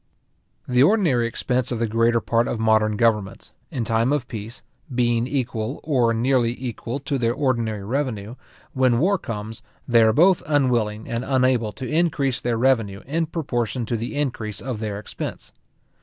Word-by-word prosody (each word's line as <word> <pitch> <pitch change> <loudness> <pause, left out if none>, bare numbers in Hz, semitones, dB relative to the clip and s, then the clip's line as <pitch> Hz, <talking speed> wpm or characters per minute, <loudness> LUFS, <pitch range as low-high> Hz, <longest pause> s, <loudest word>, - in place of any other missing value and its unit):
The 125 0 +3
ordinary 150 - +3
expense 125 +1 -1
of 120 - -1
the 115 - 0
greater 115 +1 +2
part 115 0 +1
of 115 - -2
modern 110 -1 +2
governments, 105 -4 0 0.2
in 120 -3 -3
time 115 +3 +1
of 145 -4 0
peace, 110 +1 -7 0.3
being 120 -1 +1
equal, 125 -2 -2
or 125 -7 +2
nearly 120 0 +1
equal, 120 0 -4
to 140 -1 -2
their 120 0 +1
ordinary 115 -7 -1
revenue, 115 -2 -2 0.4
when 130 -2 +3
war 185 +8 +2
comes, 110 -4 -6 0.3
they 120 -2 +5
are 110 0 +5
both 175 - +4
unwilling 120 -7 +1
and 115 +1 -2
unable 130 -4 +1
to 130 - -6
increase 150 -5 +1
their 120 -1 0
revenue 115 -6 +1
in 160 +4 -1
proportion 125 -7 -2
to 120 - -2
the 115 +5 -4
increase 120 -8 -2
of 125 -4 -4
their 105 -2 -3
expense. 105 - -7
120 Hz, 165 wpm, -23 LUFS, 115-130 Hz, 0.4 s, they